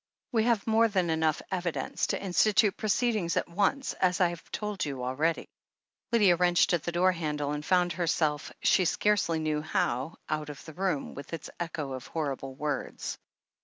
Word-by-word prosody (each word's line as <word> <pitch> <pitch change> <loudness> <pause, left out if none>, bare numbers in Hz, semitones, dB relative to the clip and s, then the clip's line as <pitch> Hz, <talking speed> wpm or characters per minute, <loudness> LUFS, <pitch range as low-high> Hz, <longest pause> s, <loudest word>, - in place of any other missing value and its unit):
We 225 -2 +2
have 235 -4 +2
more 225 +1 +4
than 185 -6 0
enough 160 -1 +1
evidence 175 -3 -1
to - - -1
insti 195 +2 +2
tute 215 -2 +4
proceedings 215 -4 0
at - - 0
once, 205 +10 0
as 180 0 +1
I 180 -2 +4
have 170 -1 -9
told 210 -2 -3
you 135 -4 -4
already." 150 +6 0 0.6
Lydia 205 -7 +5
wrenched 175 0 +3
at 170 - +2
the 170 - -3
door 180 +2 +3
handle 150 -4 -2
and 150 0 -3
found 180 0 +2
her 175 0 -2
self, 155 -2 0
she 185 - +4
scarcely 180 -2 +2
knew 155 -1 -1
how, 140 -1 -1
out 155 -1 -2
of 145 - -9
the 160 - -9
room, 180 -4 -1
with 140 +3 -9
its 165 - -6
echo 165 -5 -4
of 130 -1 -6
horrible 135 -4 -3
words. 145 -1 -3
170 Hz, 185 wpm, -29 LUFS, 150-190 Hz, 0.6 s, Lydia